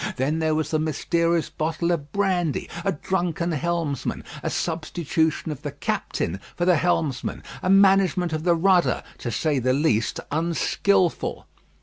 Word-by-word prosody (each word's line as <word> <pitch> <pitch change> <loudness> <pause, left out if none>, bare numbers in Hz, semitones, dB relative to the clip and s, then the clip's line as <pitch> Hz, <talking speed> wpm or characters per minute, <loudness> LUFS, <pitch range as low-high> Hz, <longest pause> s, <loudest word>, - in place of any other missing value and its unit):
Then 140 +5 0
there 160 -1 +1
was 155 0 -1
the 155 - +2
mysterious 165 +2 0
bottle 165 +2 -1
of 150 -4 -2
brandy; 185 -6 0 0.2
a 195 - +1
drunken 175 0 -1
helmsman; 160 -3 -2 0.2
a - - -2
substitution 160 -1 -1
of 145 -2 -7
the 145 -2 -4
captain 95 -9 -2 0.2
for 175 - 0
the 180 -2 +5
helmsman; 150 -5 -1 0.2
a 185 - -1
management 190 -3 +4
of 155 - -1
the 175 -1 +4
rudder, 180 +1 +3 0.2
to 120 - -4
say 145 +4 0
the 130 +1 +2
least, 130 -6 +1
unskilful. 170 +3 +1
165 Hz, 145 wpm, -24 LUFS, 150-175 Hz, 0.2 s, the